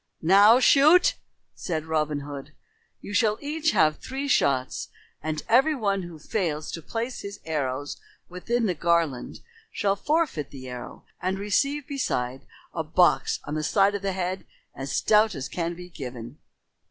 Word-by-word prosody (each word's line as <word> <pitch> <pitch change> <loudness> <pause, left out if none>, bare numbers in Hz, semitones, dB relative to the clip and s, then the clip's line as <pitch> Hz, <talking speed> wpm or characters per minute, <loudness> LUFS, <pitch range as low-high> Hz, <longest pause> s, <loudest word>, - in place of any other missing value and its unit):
"Now 200 +7 +7
shoot!" 300 +7 +6 0.4
said 160 -4 -4
Robin 150 -2 -1
Hood. 145 +1 -8 0.5
"You 205 - -8
shall 215 0 +2
each 305 +2 -4
of - - +4
you - - +1
have 155 0 +3
three 270 +2 -5
shots, 130 - +1 0.3
and 155 0 -3
every 270 +7 +4
one 200 -6 0
who 175 -2 -9
fails 155 -2 -2
to 165 - -6
place 230 +8 -4
his 200 0 -8
arrows 145 -3 -3 0.3
within 230 +7 -1
the 185 - +1
garland 165 -5 0 0.3
shall 200 -2 0
forfeit 290 - 0
the 130 -2 -10
arrow 125 -1 -9 0.2
and 185 +1 -1
receive 275 +9 0
beside 135 - -3 0.3
a 165 - -2
box 175 +3 +2
on 145 - -6
the 155 - -1
side 195 +4 +3
of 205 - -3
the 195 -1 -1
head 185 0 -3 0.3
as 135 +1 -6
stout 215 -2 +3
as 135 -1 -4
can 170 -1 -3
be 180 +1 -10
given." 125 -3 -8
180 Hz, 165 wpm, -26 LUFS, 150-220 Hz, 0.5 s, Now